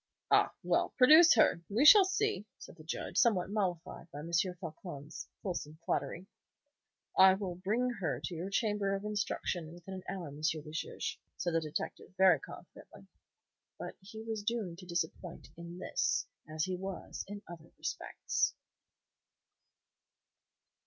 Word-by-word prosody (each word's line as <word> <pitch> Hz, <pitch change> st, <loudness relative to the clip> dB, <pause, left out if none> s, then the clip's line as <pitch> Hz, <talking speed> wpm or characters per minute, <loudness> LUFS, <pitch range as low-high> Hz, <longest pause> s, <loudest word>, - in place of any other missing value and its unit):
"Ah, -, -, +5 dB
well, -, -, +2 dB
produce 315 Hz, +6 st, +8 dB
her! 170 Hz, -, +4 dB
We 225 Hz, +8 st, +2 dB
shall 395 Hz, +5 st, +10 dB
see," 385 Hz, -, -1 dB
said -, -, -12 dB
the 155 Hz, -, -12 dB
Judge, 160 Hz, -, -4 dB
somewhat 195 Hz, -5 st, +3 dB
mollified 180 Hz, -5 st, -3 dB
by 145 Hz, -, -7 dB
M. 165 Hz, +3 st, -7 dB
Floçon's 170 Hz, -4 st, -3 dB, 0.2 s
fulsome 155 Hz, -5 st, -4 dB
flattery. 180 Hz, -, -2 dB, 0.9 s
"I 190 Hz, 0 st, +8 dB
will 190 Hz, -2 st, -4 dB
bring 205 Hz, +8 st, 0 dB
her 145 Hz, -9 st, -1 dB
to 175 Hz, -, -4 dB
your 170 Hz, +3 st, -4 dB
chamber 205 Hz, -1 st, 0 dB
of 195 Hz, +1 st, -5 dB
instruction 195 Hz, -5 st, -2 dB
within 175 Hz, +2 st, -10 dB
an 185 Hz, -1 st, -7 dB
hour, 180 Hz, -5 st, -5 dB
M. 140 Hz, -, -10 dB
le 155 Hz, 0 st, -2 dB
Juge," 155 Hz, -, -4 dB, 0.2 s
said 175 Hz, -, -1 dB
the 165 Hz, -, +2 dB
detective, 155 Hz, +4 st, -5 dB
very 185 Hz, -5 st, +6 dB
confidently. -, -, -13 dB, 0.7 s
But -, -, -7 dB
he 220 Hz, +3 st, -9 dB
was 225 Hz, -1 st, -3 dB
doomed 205 Hz, -6 st, -3 dB
to 180 Hz, -, -11 dB
disappointment 175 Hz, 0 st, -4 dB
in 170 Hz, +1 st, -9 dB
this -, -, 0 dB, 0.2 s
as 155 Hz, 0 st, -2 dB
he 185 Hz, -, -2 dB
was 190 Hz, 0 st, -6 dB
in 205 Hz, 0 st, -8 dB
other 165 Hz, -2 st, -11 dB
respects. -, -, -1 dB
185 Hz, 145 wpm, -33 LUFS, 165-205 Hz, 0.9 s, shall